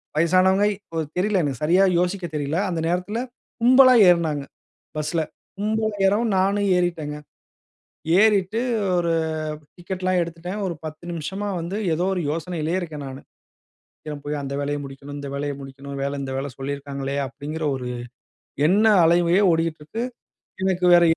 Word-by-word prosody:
வயசானவங்கை 185 +5 +4 0.2
ஓ - - -5 0.2
தெரியல 195 0 +2
எனக்கு 135 -5 -3
சரியா 180 +5 +4 0.2
யோசிக்கத் 180 -3 -2
தெரியல. 145 +2 -1
அந்த 170 -2 -2
நேரத்தில 180 +6 -1 0.4
கும்பலா 255 +2 +7
ஏறினாங்க 165 -4 +3 0.6
பஸ்ல. 155 +2 0 0.4
கும்பலா 215 +2 0 0.2
ஏறவும், 215 +3 +2
நானும் 200 +2 +2
ஏறிட்டேங்க. 160 -4 -1 1.0
ஏறிட்டு 210 0 +3 0.4
ஒரு 170 -1 +1 0.6
டிக்கெட்லாம் 185 +1 -1
எடுத்துட்டேன். 170 +4 -5
ஒரு 175 - -2
10 155 +2 -7
நிமிஷமா 190 +6 -4
வந்து 170 +4 -4 0.2
ஏதோ 170 +3 0
ஒரு 180 - -1
யோசனையிலே 165 +1 -2
இருக்கேன் 155 -4 -6
நானு. 135 0 -7 0.8
"சீக்கிரம் 150 -2 -7
போய் 150 0 -2
அந்த 140 - -4
வேலைய 145 +1 -1
முடிக்கணும், 140 +1 -9
இந்த 140 -1 -6
வேலைய 145 +1 -2
முடிக்கணு. 135 +1 -9
அந்த 135 - -4
வேல, 140 0 -3
இந்த 135 -1 -4
வேல 140 +1 -3
சொல்லியிருக்காங்களே!" 140 0 -4
அப்டிங்கிற 150 +4 -5
ஒரு 125 -1 -5 0.8
எண்ண 210 +4 +4 0.2
அலையே 170 +3 +4
ஓடிகிட்டு 165 -1 0
இருக்கு. 225 +9 -4 0.6
எனக்கு 185 -1 +1
வேற 175 - +6
170 Hz, 140 wpm, -23 LUFS, 145-190 Hz, 1.0 s, கும்பலா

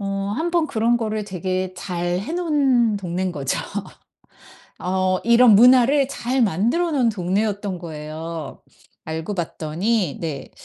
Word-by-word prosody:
어 200 - -4 0.3
1 330 +4 -1
번 340 -2 +2
그런 235 -2 +1
거를 215 -2 -2
되게 185 -1 -3
잘해 180 - -3
놓은 275 -10 +2
동네인 185 -1 -2
거죠. 140 -5 -2 1.2
어. 185 0 0
이런 235 -1 +6
문화를 255 +4 +6
잘 260 -1 -1
만들어 235 - +1
놓은 260 -5 +2
동네였던 200 -1 -1
거예요. 155 -1 -7 0.5
알고 160 +5 -4
봤더니 175 +2 -1
네. 155 -5 -5
200 Hz, 235 characters per minute, -22 LUFS, 175-240 Hz, 1.2 s, 이런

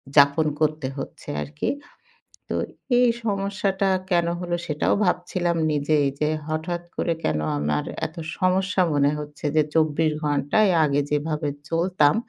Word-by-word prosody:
যাপন 145 +2 +6
করতে 155 -2 +1
হচ্ছে 135 - -7 0.2
আরকি। 75 0 -3 0.8
তো - - -1 0.4
এই 250 - +5 0.2
সমস্যাটা 195 -1 0 0.2
কেন 170 -1 +3
হলো 175 -1 -1
সেটাও 150 -1 +1
ভাবছিলাম 175 -1 0
নিজেই 150 0 +2
এই - - -1
যে, 150 - +2 0.2
হঠাৎ 165 +2 -2
করে 170 - 0
কেন 75 - +1 0.2
আমার 75 0 0 0.2
এতো 160 +1 -6 0.2
সমস্যা 185 +1 +2
মনে 145 0 +3
হচ্ছে। 150 0 -8
যে, 155 - +6
চব্বিশ 155 0 +3
ঘন্টায় 145 +8 +2
আগে 145 -1 +2
যেভাবে 150 0 0 0.2
চলতাম 165 -3 +3
155 Hz, 135 wpm, -24 LUFS, 145-180 Hz, 0.8 s, যাপন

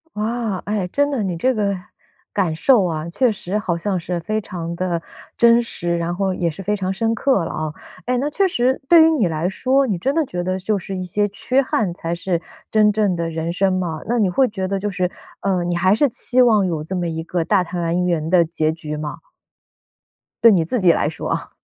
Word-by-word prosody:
哇， 220 -2 -2
哎， 205 -3 -1
真 285 +8 +1
的， 255 -6 -1
你 180 -3 -2
这 260 +9 +1
个 200 -3 0 0.6
感 185 -6 0
受 210 +4 +4
啊， 160 -1 -3
确 250 +7 +2
实 200 -1 -4
好 190 -5 -1
像 185 +2 -1
是 175 +1 -3
非 215 +6 -2
常 170 -4 -6
地 175 -1 -1 0.4
真 235 0 +5
实， 175 -6 -3
然 170 +1 -2
后 190 +1 0
也 170 -2 0
是 165 +5 -8
非 210 +2 0
常 190 -2 -2
深 225 +4 0
刻 230 -6 +1
了 - - -5
啊。 155 -1 -3 0.3
哎， 250 - +1
那 270 +4 0
确 385 +5 +2
实 255 -4 +1
对 335 -2 +8
于 325 - +5
你 245 - +2
来 160 +2 -1
说， 265 +7 +1
你 200 -6 -1
真 270 +10 0
的 320 -1 +2
觉 180 -8 -4
得 185 +1 -1
就 200 +2 -1
是 190 +1 -6
一 185 - -4
些 205 +4 0
缺 255 +6 0
憾 220 -7 0
才 170 -1 -3
是 170 0 -2 0.3
真 215 -1 +4
正 205 -3 +1
的 170 -1 -2
人 165 +1 -3
生 190 +2 +2
吗？ 175 -4 -2
那 240 - +1
你 210 -4 +3
会 255 +8 +3
觉 190 -3 -3
得 195 +1 -1
就 205 +2 -2
是， 180 -1 -1 0.3
呃， 190 -3 0
你 175 0 -1
还 185 +3 +3
是 285 +5 +3
期 250 +2 0
望 215 -5 +4
有 160 -4 -2
这 185 +4 -4
么 175 -1 -1
一 160 -1 -3
个 170 0 -2
大 195 -1 +3
团圆 170 -2 -1
的 175 -2 +5
结 160 -1 -1
局 150 -2 -6
吗？ 150 0 -5 1.3
对 230 - +9
你 175 -5 +3
自 245 +10 -1
己 180 -3 +5
来 150 - +1
说 155 - -5
啊。 - - -3
185 Hz, 250 characters per minute, -20 LUFS, 170-220 Hz, 1.3 s, 对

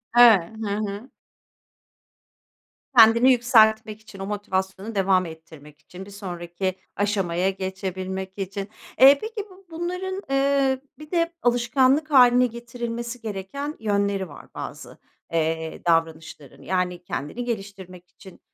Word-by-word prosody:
Eee 225 -6 +6
Hı 215 - -3
hı. 210 +4 -5 1.9
Kendini 235 +3 +7
yükseltmek 220 -3 +3
için, 215 -2 -14
o 195 - -4
motivasyonu 195 +1 -3
devam 190 -1 +2
ettirmek 160 -2 -13
için, 180 +4 -11
bir 205 - -13
sonraki 185 -1 -4 0.2
aşamaya 195 -3 0
geçebilmek 190 0 -5
için. 195 +1 -5 0.3
Eee, 275 +2 +9
peki 440 -2 -5
bu 375 +1 -18
bunların, 365 +3 -4
ııı, 275 -1 +2 0.2
bir 305 0 -12
de 335 -1 0
alışkanlık 255 +5 +2
hâline 250 -2 +6
getirilmesi 235 0 -6
gereken 225 +8 -5
yönleri 200 -3 0
var, - - -13
bazı, - - -8 0.4
eee, 160 0 -1
davranışların. 160 -4 -1
Yani, 180 -1 -2
kendini 160 - -5
geliştirmek 195 -5 -7
için, 190 0 -16
205 Hz, 115 wpm, -24 LUFS, 185-245 Hz, 1.9 s, Eee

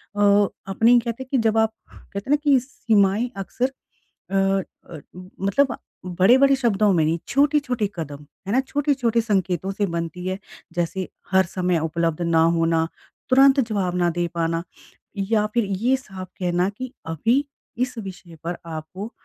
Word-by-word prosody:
अ, 205 0 +4 0.2
अपने 225 +5 +4
ही 245 - +7
कहते 235 +2 -4
हैं - - -19
कि 270 - +3
जब 225 -1 +2
आप 220 0 +2 0.2
कहते 200 +5 -9
हैं - - +1
ना - - +7
कि 280 -3 +5
सीमाएँ 220 -3 +1
अक्सर 245 +7 -2 0.6
अ - - -1
अ, 195 -4 -1 0.4
मतलब 240 +6 +2 0.3
बड़े-बड़े 245 +10 +5
शब्दों 215 -5 +2
में 165 - +3
नहीं, 165 +2 +1
छोटे-छोटे 280 -6 +2
कदम, 145 -3 -6 0.2
है - - -2
ना? 260 - +4
छोटे-छोटे 265 -5 +1
संकेतों 190 -4 0
से 205 +1 -1
बनती 170 +1 -4
है। 190 +1 -2 0.3
जैसे 175 +2 -2 0.2
हर 190 -1 +4
समय 180 -1 0
उपलब्ध 165 +1 -1
ना 165 -1 +3 0.2
होना, 165 0 +2 0.4
तुरंत 270 +1 +6
जवाब 185 -4 -1
ना 175 -1 +2
दे 175 0 -1
पाना 165 0 0 0.5
या 210 +2 +1
फिर 235 -3 +2
ये 215 +7 +1
साफ 190 -7 -9
कहना 180 +1 +1
कि 255 +5 -7
अभी 230 - +1 0.3
इस 250 0 -2
विषय 185 -5 -8
पर 170 +1 -3
आपको 165 +7 -7
195 Hz, 160 wpm, -23 LUFS, 175-240 Hz, 0.6 s, ही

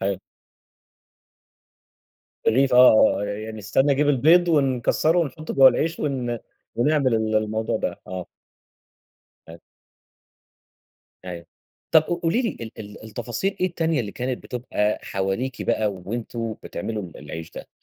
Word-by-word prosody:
ح 100 0 0 2.3
رغيف 130 +2 +3
آه 125 -5 +6
آه - - -1
يعني 110 +2 -5
استنى 135 +7 +2
أجيب 145 +2 +1
البيض 160 +6 +5
ونكسّره 145 +2 +2
ونحطه 155 -1 -3
جوا 135 -1 +8
العيش 160 +6 -1
ون 125 -5 -2 0.4
ونعمل 135 0 +2
ال 110 -1 +1
الموضوع 110 +1 -1
ده، - - -3
آه. 90 -1 -6 1.2
أ 85 +1 -11 1.7
أيوه، 85 -2 -7 0.4
طَب 160 -2 +6
ق - - -15 0.2
قولي 170 +10 +1
لي 235 - 0
ال 115 -1 -8
ال 105 0 -10
التفاصيل 120 - -3
إيه 185 - +3
التانية 165 -4 0
اللي 105 -4 -5
كانت 125 0 -4
بتبقى 115 -4 -2
حواليكِ 95 +7 -3
بقى 110 -2 +1
وأنتم 115 +4 -5
بتعملوا 110 -2 -4
ال 85 -4 -10
العيش 80 +2 -8
ده؟ - - -10
120 Hz, 130 wpm, -23 LUFS, 105-145 Hz, 2.3 s, جوا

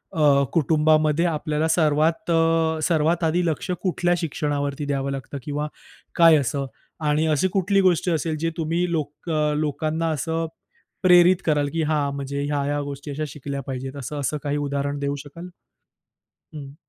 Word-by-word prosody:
अ, 145 -3 +4
कुटुंबामध्ये 155 +1 +3
आपल्याला 155 -1 -1
सर्वात 160 +1 +1
अ, 165 -1 +2
सर्वात 165 +1 +1
आधी 175 +2 +1
लक्ष 160 +2 -2
कुठल्या 175 -2 +1
शिक्षणावरती 145 -3 -2
द्यावं 140 -1 -2
लागतं? 135 +1 -6
किंवा 150 0 -3 0.5
काय 165 -2 +7
असं? 140 0 -1 0.4
आणि 150 +1 +2
अशी 155 +4 +2
कुठली 195 +1 +2
गोष्ट 180 -1 +2
असेल, 160 -1 0
जे 165 +1 0
तुम्ही 165 +2 0
लोक 155 0 -4 0.3
लोकांना 155 +2 -1
असं 160 +3 -2 0.6
प्रेरित 180 0 +7
कराल 145 -2 +2
की 165 - 0
हां, 150 -2 0
म्हणजे 140 0 -4
ह्या-ह्या 145 0 -1
गोष्टी 140 +1 -6
अशा 150 +2 -3
शिकल्या 140 0 -6
पाहिजेत. 135 +1 -5
असं-असं 140 +2 -3
काही 145 0 -1
उदाहरण 140 0 -2
देऊ 140 0 -1
शकाल? 150 +5 -10 1.1
हं. 140 -2 -9
150 Hz, 145 wpm, -23 LUFS, 145-165 Hz, 1.1 s, काय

